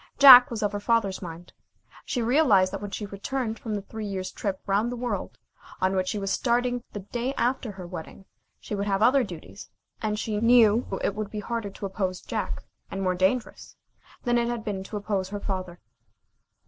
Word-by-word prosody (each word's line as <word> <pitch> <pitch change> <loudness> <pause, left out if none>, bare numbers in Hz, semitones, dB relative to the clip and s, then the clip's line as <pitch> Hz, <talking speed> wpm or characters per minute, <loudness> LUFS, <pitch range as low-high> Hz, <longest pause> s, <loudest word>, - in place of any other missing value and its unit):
Jack 255 -3 +11
was 225 -3 -3
of 205 - +1
her 205 - -3
father's 205 -3 +1
mind. 170 -1 -9 0.5
She 245 - -1
realized 225 -8 +4
that 195 - -4
when 205 - -5
she 205 +1 -5
returned 220 +3 -4
from 220 -3 -4
the 200 - -4
three 220 +1 -6
years' 185 -2 -4
trip 195 -2 -3
round 205 +4 +1
the - - -3
world, 235 -5 -4 0.4
on 190 +1 +1
which 185 -1 0
she 210 - -1
was 195 -1 -2
starting 245 +1 +1
the 205 - -5
day 240 +7 -3
after 245 -2 -1
her 185 -2 -8
wedding, 180 +2 -9 0.3
she - - -7
would 200 0 -2
have 195 +1 +1
other 260 +3 +5
duties, 175 -7 -9 0.3
and 215 -2 -1
she 210 -1 -2
knew 230 -1 +5 0.2
it - - +1
would 210 0 -4
be 210 - -5
harder 230 -1 -3
to 200 - -7
oppose 190 -2 -2
Jack, - - -4 0.3
and 195 0 -4
more 185 -1 +2
dangerous 190 +7 -1 0.5
than 240 -1 +2
it 235 - 0
had 240 -1 -3
been 195 -3 -3
to 210 - -5
oppose 200 -2 -2
her 205 0 -4
father. 185 -3 -4
210 Hz, 200 wpm, -26 LUFS, 195-235 Hz, 0.5 s, Jack